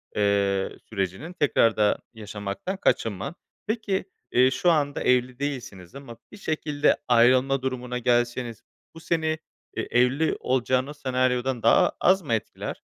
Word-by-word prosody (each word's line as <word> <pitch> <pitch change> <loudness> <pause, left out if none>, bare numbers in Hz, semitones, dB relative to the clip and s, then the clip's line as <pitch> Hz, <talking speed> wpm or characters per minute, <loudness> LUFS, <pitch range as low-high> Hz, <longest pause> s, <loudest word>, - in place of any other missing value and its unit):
eee, 100 -1 +1
sürecinin 100 - -3
tekrarda 115 - +2
yaşamaktan 105 - -5
kaçınma. 115 - 0 0.3
Peki, 215 -4 -1 0.3
eee, 130 +1 +4
şu 175 +5 +2
anda 145 -3 0
evli 125 0 +1
değilsiniz 120 -11 -5
ama 135 -4 -10
bir 210 - -11
şekilde 150 -4 0
ayrılma 130 +3 +4
durumuna 125 -1 -3
gelseniz 120 -1 0 0.3
bu 165 - -9
seni 160 -1 -1 0.4
e - - -2
evli 125 +6 +2
olacağınız 130 +3 0
senaryodan 130 -2 0
daha 115 - +5
az 190 +1 +4
mı 140 -9 -2
etkiler? 110 - -4
125 Hz, 125 wpm, -25 LUFS, 115-145 Hz, 0.4 s, daha